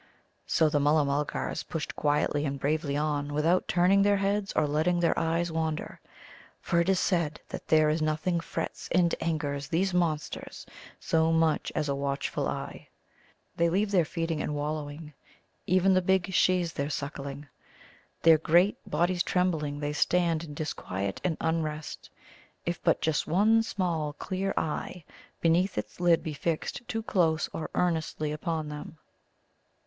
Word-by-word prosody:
So 160 Hz, -, +3 dB
the 150 Hz, -1 st, +1 dB
Mulla 150 Hz, +1 st, +3 dB
mulgars 145 Hz, +1 st, -2 dB
pushed 160 Hz, -3 st, -5 dB
quietly 145 Hz, 0 st, +1 dB
and 140 Hz, -2 st, -2 dB
bravely 145 Hz, 0 st, 0 dB
on, 145 Hz, -1 st, -1 dB
without 165 Hz, +5 st, +2 dB
turning 185 Hz, +3 st, +4 dB
their 200 Hz, 0 st, +4 dB
heads 200 Hz, 0 st, 0 dB
or 155 Hz, -, +2 dB
letting 160 Hz, +4 st, +1 dB
their 170 Hz, -, +3 dB
eyes 165 Hz, +1 st, 0 dB
wander. 160 Hz, -1 st, -3 dB, 0.6 s
For 170 Hz, -, 0 dB
it 170 Hz, -, 0 dB
is 190 Hz, -1 st, +3 dB
said 170 Hz, -5 st, 0 dB
that -, -, -7 dB
there 155 Hz, -1 st, +5 dB
is 155 Hz, +1 st, +1 dB
nothing 155 Hz, +3 st, 0 dB
frets 165 Hz, -, -5 dB
and 170 Hz, -1 st, +3 dB
angers 145 Hz, -4 st, -2 dB
these 185 Hz, +3 st, 0 dB
monsters 165 Hz, -4 st, -2 dB, 0.3 s
so 160 Hz, 0 st, +2 dB
much 165 Hz, -1 st, +2 dB
as 150 Hz, -, 0 dB
a 140 Hz, -, 0 dB
watchful 140 Hz, 0 st, -2 dB
eye. -, -, -5 dB, 0.7 s
They 170 Hz, 0 st, +2 dB
leave 200 Hz, +4 st, +1 dB
their 185 Hz, -4 st, +4 dB
feeding 165 Hz, -1 st, -2 dB
and 150 Hz, -, -2 dB
wallowing, 150 Hz, +1 st, -4 dB, 0.5 s
even 185 Hz, +1 st, +4 dB
the 185 Hz, -, +4 dB
big 190 Hz, 0 st, +1 dB
Shes 180 Hz, -2 st, +2 dB
their 140 Hz, +1 st, -2 dB
suckling. 140 Hz, -1 st, -5 dB, 0.8 s
Their 165 Hz, -1 st, +7 dB
great 175 Hz, +6 st, +3 dB
bodies 175 Hz, +1 st, +1 dB
trembling, 155 Hz, -6 st, 0 dB
they 145 Hz, 0 st, -2 dB
stand 170 Hz, +1 st, +1 dB
in 150 Hz, -3 st, -8 dB
disquiet 100 Hz, -10 st, -4 dB
and 170 Hz, -4 st, 0 dB
unrest 155 Hz, -2 st, -3 dB, 0.6 s
if 170 Hz, 0 st, -2 dB
but 165 Hz, -, +2 dB
just 160 Hz, -2 st, 0 dB
one 215 Hz, +7 st, +4 dB
small 170 Hz, -8 st, -2 dB
clear 190 Hz, +5 st, -3 dB
eye 160 Hz, +2 st, -3 dB, 0.4 s
beneath 175 Hz, +3 st, +2 dB
its -, -, -5 dB
lid 175 Hz, -2 st, +3 dB
be 155 Hz, -, -4 dB
fixed 165 Hz, -, -3 dB
too 225 Hz, 0 st, -3 dB
close 165 Hz, -7 st, +1 dB
or 160 Hz, -, -4 dB
earnestly 160 Hz, -3 st, 0 dB
upon 155 Hz, 0 st, -3 dB
them. 150 Hz, +2 st, -8 dB
160 Hz, 155 wpm, -28 LUFS, 150-175 Hz, 0.8 s, Their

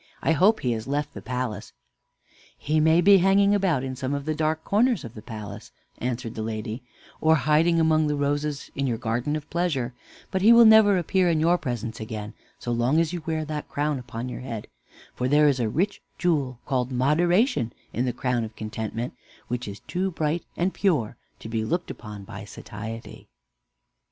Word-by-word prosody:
I -, -, +3 dB
hope 190 Hz, +8 st, +4 dB
he 125 Hz, -, 0 dB
has 110 Hz, 0 st, -3 dB
left 145 Hz, +1 st, -2 dB
the -, -, -8 dB
palace." 125 Hz, -1 st, -4 dB, 0.8 s
"He 155 Hz, +2 st, 0 dB
may 160 Hz, +2 st, +5 dB
be 195 Hz, +2 st, +7 dB
hanging 200 Hz, +2 st, +4 dB
about 185 Hz, -10 st, +2 dB
in 130 Hz, -1 st, -4 dB
some 135 Hz, +2 st, -2 dB
dark 155 Hz, +1 st, -1 dB
corners 235 Hz, +4 st, +2 dB
of 115 Hz, -, -8 dB
the 110 Hz, -, -9 dB
palace," 105 Hz, -1 st, -8 dB, 0.3 s
answered 120 Hz, -1 st, -3 dB
the 110 Hz, -, -5 dB
lady, 110 Hz, +2 st, -4 dB, 0.4 s
"or 160 Hz, 0 st, +5 dB
hiding 155 Hz, +4 st, +3 dB
among 155 Hz, -1 st, +3 dB
the 150 Hz, -, 0 dB
roses 145 Hz, 0 st, -2 dB
in 140 Hz, 0 st, -1 dB
your 120 Hz, -3 st, 0 dB
garden 120 Hz, +5 st, -1 dB
of 150 Hz, -1 st, -5 dB
Pleasure; 150 Hz, -8 st, -1 dB, 0.4 s
but 190 Hz, -, 0 dB
he 215 Hz, +4 st, +7 dB
will 235 Hz, 0 st, +8 dB
never 220 Hz, -3 st, +7 dB
appear 180 Hz, +1 st, +2 dB
in 160 Hz, -2 st, +2 dB
your 170 Hz, +3 st, +4 dB
presence 120 Hz, -4 st, -4 dB
again, 110 Hz, -1 st, -6 dB, 0.2 s
so 120 Hz, -, -4 dB
long 120 Hz, +6 st, +2 dB
as 165 Hz, 0 st, +1 dB
you 175 Hz, -, -3 dB
wear 160 Hz, -1 st, -1 dB
that 150 Hz, -1 st, -5 dB
crown 145 Hz, -1 st, -1 dB
upon 120 Hz, 0 st, -6 dB
your 125 Hz, -, -6 dB
head; 115 Hz, -5 st, -5 dB, 0.5 s
for 125 Hz, -, -1 dB
there 150 Hz, +2 st, +5 dB
is 135 Hz, -3 st, +2 dB
a 115 Hz, -3 st, +1 dB
rich 190 Hz, -, -1 dB, 0.2 s
jewel 145 Hz, -8 st, 0 dB
called 130 Hz, -2 st, -1 dB
Moderation 160 Hz, -, +2 dB, 0.2 s
in 125 Hz, -, 0 dB
the 125 Hz, -, 0 dB
crown 125 Hz, -1 st, -1 dB
of 110 Hz, 0 st, -7 dB
Contentment 110 Hz, +2 st, -4 dB, 0.4 s
which 125 Hz, 0 st, -3 dB
is 100 Hz, 0 st, -7 dB
too 185 Hz, +2 st, -2 dB
bright 160 Hz, -1 st, -1 dB
and 180 Hz, +2 st, 0 dB
pure 140 Hz, -, +1 dB, 0.2 s
to -, -, -9 dB
be 110 Hz, -1 st, -1 dB
looked 175 Hz, +10 st, -2 dB
upon 105 Hz, -3 st, -9 dB
by 100 Hz, -1 st, -8 dB
Satiety." 110 Hz, +2 st, -8 dB
140 Hz, 190 wpm, -25 LUFS, 115-165 Hz, 0.8 s, will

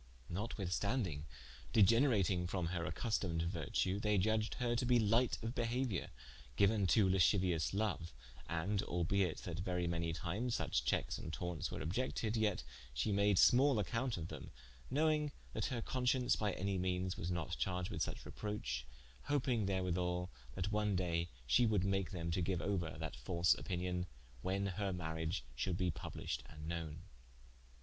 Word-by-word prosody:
Notwithstanding, 95 Hz, -, -1 dB, 0.5 s
degenerating 105 Hz, -5 st, +4 dB
from 90 Hz, -1 st, -1 dB
her 85 Hz, -2 st, -1 dB
accustomed 90 Hz, -8 st, -1 dB
vertue, 85 Hz, +3 st, 0 dB
they 105 Hz, -1 st, +2 dB
iudged 110 Hz, +3 st, +1 dB
her 120 Hz, -1 st, 0 dB
to 125 Hz, -, +1 dB
be 125 Hz, 0 st, +4 dB
light 115 Hz, +3 st, +3 dB
of 115 Hz, +1 st, -2 dB
behauiour, 120 Hz, -4 st, -1 dB, 0.5 s
giuen 100 Hz, -1 st, +4 dB
to 100 Hz, +1 st, +5 dB
lasciuious 90 Hz, -3 st, +3 dB
loue: 100 Hz, -5 st, -1 dB, 0.4 s
and 95 Hz, +5 st, 0 dB
albeit 90 Hz, -1 st, +1 dB
that 85 Hz, -1 st, -4 dB
verie 90 Hz, -1 st, -1 dB
many 85 Hz, -1 st, 0 dB
times, 105 Hz, +9 st, -2 dB
such -, -, 0 dB
checkes 60 Hz, -, 0 dB
and 80 Hz, -, -5 dB
tauntes 85 Hz, -1 st, -3 dB
were -, -, -4 dB
obiected, 110 Hz, +4 st, -1 dB
yet 105 Hz, -, +1 dB, 0.3 s
she -, -, +1 dB
made 100 Hz, -1 st, +3 dB
smal 135 Hz, +2 st, +6 dB
accompte 115 Hz, +4 st, -1 dB
of 85 Hz, -1 st, -5 dB
them, -, -, -7 dB, 0.4 s
knowing 150 Hz, +1 st, +2 dB, 0.2 s
that -, -, -1 dB
her 120 Hz, -4 st, -2 dB
conscience 125 Hz, 0 st, +2 dB
by 105 Hz, -2 st, 0 dB
anye 95 Hz, 0 st, -1 dB
meanes 90 Hz, 0 st, 0 dB
was 85 Hz, -, -3 dB
not 85 Hz, -3 st, -2 dB
charged 90 Hz, -1 st, -1 dB
with -, -, -3 dB
such -, -, -2 dB
reproch: 105 Hz, -, -3 dB, 0.4 s
hoping 125 Hz, -7 st, +1 dB
therwithall 90 Hz, -1 st, 0 dB, 0.3 s
that 95 Hz, +3 st, -2 dB
one 105 Hz, -2 st, +1 dB
daye 85 Hz, -2 st, 0 dB, 0.2 s
she 120 Hz, -, +4 dB
would 105 Hz, -4 st, +2 dB
make 95 Hz, -1 st, +1 dB
them 85 Hz, -3 st, -3 dB
to 90 Hz, -, +1 dB
give 90 Hz, 0 st, 0 dB
ouer 85 Hz, -6 st, -1 dB
that 80 Hz, 0 st, -4 dB
false 85 Hz, -1 st, +3 dB
opinion 90 Hz, -1 st, -2 dB, 0.3 s
when 95 Hz, +2 st, 0 dB
her 100 Hz, +1 st, -1 dB
mariage 80 Hz, 0 st, -2 dB
should 90 Hz, -3 st, -1 dB
be 90 Hz, -2 st, +1 dB
published -, -, -4 dB
and 75 Hz, 0 st, -9 dB
knowen. 85 Hz, -1 st, -4 dB
95 Hz, 155 wpm, -37 LUFS, 85-110 Hz, 0.5 s, smal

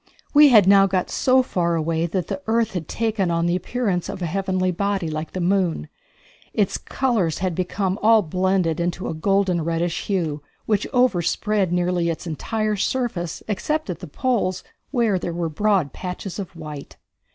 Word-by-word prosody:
We 295 Hz, 0 st, +8 dB
had 215 Hz, -7 st, +7 dB
now 195 Hz, 0 st, +7 dB
got 185 Hz, -1 st, -1 dB
so 260 Hz, 0 st, +3 dB
far 170 Hz, -7 st, 0 dB
away 165 Hz, +1 st, 0 dB
that 180 Hz, 0 st, -2 dB
the 190 Hz, -1 st, -5 dB
earth 230 Hz, 0 st, +2 dB
had 170 Hz, -5 st, -4 dB
taken 215 Hz, -5 st, -1 dB
on 170 Hz, 0 st, +1 dB
the 175 Hz, +1 st, +1 dB
appearance 185 Hz, -1 st, -2 dB
of -, -, -5 dB
a 180 Hz, -, -2 dB
heavenly 185 Hz, +1 st, 0 dB
body 200 Hz, -1 st, -1 dB
like 155 Hz, +1 st, -5 dB
the 185 Hz, -, -3 dB
moon. 175 Hz, -, 0 dB, 0.7 s
Its 205 Hz, -3 st, +1 dB
colors 220 Hz, -, 0 dB
had 185 Hz, -1 st, -1 dB
become 190 Hz, +3 st, -2 dB
all 220 Hz, 0 st, +5 dB
blended 185 Hz, -1 st, 0 dB
into 175 Hz, +2 st, -2 dB
a -, -, -2 dB
golden 185 Hz, 0 st, +1 dB
reddish 170 Hz, +1 st, -2 dB
hue, 165 Hz, -7 st, -1 dB, 0.2 s
which 210 Hz, -2 st, 0 dB
overspread 210 Hz, -4 st, +1 dB
nearly 175 Hz, -1 st, +1 dB
its 165 Hz, -, -4 dB
entire 215 Hz, +6 st, -2 dB
surface, 195 Hz, -7 st, -2 dB
except 300 Hz, +4 st, -1 dB
at 170 Hz, -, -7 dB
the -, -, -8 dB
poles, 185 Hz, -, -1 dB, 0.3 s
where 230 Hz, -8 st, +1 dB
there 175 Hz, -, -4 dB
were 170 Hz, -1 st, -2 dB
broad 190 Hz, -3 st, +1 dB
patches 180 Hz, +1 st, -6 dB
of 190 Hz, -2 st, -6 dB
white. 150 Hz, -3 st, -9 dB
185 Hz, 175 wpm, -22 LUFS, 170-210 Hz, 0.7 s, We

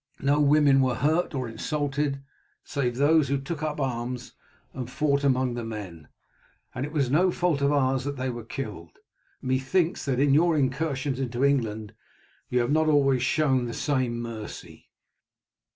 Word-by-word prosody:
No 140 Hz, +2 st, +2 dB
women 145 Hz, -2 st, +5 dB
were 130 Hz, -2 st, +1 dB
hurt 155 Hz, +6 st, +1 dB
or 130 Hz, -2 st, -2 dB
insulted, 145 Hz, +2 st, -2 dB, 0.4 s
save 125 Hz, -4 st, -2 dB
those 145 Hz, +2 st, +4 dB
who 140 Hz, +2 st, +1 dB
took 150 Hz, +3 st, -5 dB
up 150 Hz, -1 st, -2 dB
arms 125 Hz, -2 st, -3 dB, 0.4 s
and 125 Hz, -2 st, -5 dB
fought 140 Hz, +1 st, 0 dB
among 130 Hz, -2 st, +2 dB
the 120 Hz, 0 st, -4 dB
men, 100 Hz, -8 st, -7 dB, 0.7 s
and 130 Hz, +3 st, -3 dB
it -, -, -10 dB
was 140 Hz, -5 st, 0 dB
no 180 Hz, +6 st, +4 dB
fault 175 Hz, -5 st, 0 dB
of 140 Hz, +1 st, +3 dB
ours 135 Hz, -2 st, +1 dB
that 140 Hz, -1 st, -3 dB
they 130 Hz, 0 st, -2 dB
were 120 Hz, -1 st, -7 dB
killed. 105 Hz, -, -7 dB, 0.5 s
Methinks 135 Hz, +7 st, 0 dB
that 130 Hz, -3 st, 0 dB
in 140 Hz, 0 st, +4 dB
your 165 Hz, +2 st, +4 dB
incursions 135 Hz, -1 st, -1 dB
into 130 Hz, 0 st, 0 dB
England 110 Hz, -6 st, 0 dB, 0.6 s
you 125 Hz, 0 st, +2 dB
have 120 Hz, +3 st, -1 dB
not 155 Hz, +1 st, +3 dB
always 135 Hz, -4 st, +3 dB
shown 130 Hz, -2 st, +2 dB
the 115 Hz, -, -5 dB
same 130 Hz, -5 st, -1 dB
mercy." 115 Hz, -2 st, -8 dB
135 Hz, 165 wpm, -26 LUFS, 125-145 Hz, 0.7 s, women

